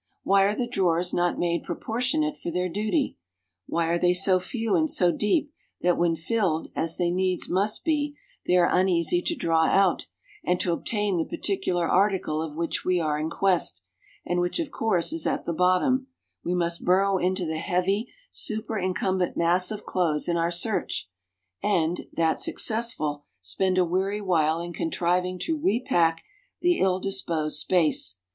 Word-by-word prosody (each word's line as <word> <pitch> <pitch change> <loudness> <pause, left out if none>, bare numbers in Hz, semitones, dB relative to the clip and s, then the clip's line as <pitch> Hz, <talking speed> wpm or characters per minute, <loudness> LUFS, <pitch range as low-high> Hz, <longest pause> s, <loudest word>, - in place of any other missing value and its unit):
Why 195 0 +4
are 205 +1 +1
the 240 - -2
drawers 180 -6 +1
not 175 0 +1
made 170 -1 0
proportionate 255 - -1
for 175 - -6
their 180 +2 -1
duty? 215 - -1 0.5
Why 170 0 0
are 170 0 +1
they 180 0 +3
so 185 0 +4
few 225 +4 -2
and 315 0 +2
so 180 -8 +3
deep 285 - 0 0.3
that 175 0 +3
when 170 -1 +1
filled 165 -1 -1
as 165 0 -1
they 175 -1 +1
needs 185 0 0
must 200 +4 0
be 295 -2 0 0.3
they 180 - +4
are 175 -1 +4
uneasy 185 - +2
to 340 - -1
draw 165 - +2
out, 195 -2 +2 0.4
and 180 0 0
to 175 - 0
obtain 205 0 -1
the 160 - 0
particular 185 -4 0
article 185 -5 +1
of 160 -2 -5
which 170 +1 -2
we 180 -1 +1
are 150 -2 -1
in 155 +1 -2
quest, 170 - 0 0.4
and 175 - 0
which 175 - 0
of 315 -4 -3
course 220 - 0
is 325 - -2
at - - -2
the 170 - -2
bottom, 185 - +2 0.4
we 180 - -1
must 170 -1 -1
burrow 190 +1 +3
into 185 0 0
the 160 0 -3
heavy 190 +7 -1 0.2
super 220 0 0
incumbent 185 0 -1
mass 175 +2 +2
of 215 -1 -5
clothes 160 -5 0
in 170 - 0
our 170 0 +1
search, 175 - -1 0.5
and 175 -4 0
that 165 -1 0
successful 185 -11 0
spend 185 - -1
a 180 - +4
weary 190 +4 -1
while 165 -4 +1
in 175 0 -6
contriving 180 +3 -1
to 315 - -3
repack 175 - +1 0.4
the 350 0 +2
ill 185 -1 +2
disposed 165 -6 -1
space. 155 - +2
180 Hz, 170 wpm, -26 LUFS, 170-205 Hz, 0.5 s, Why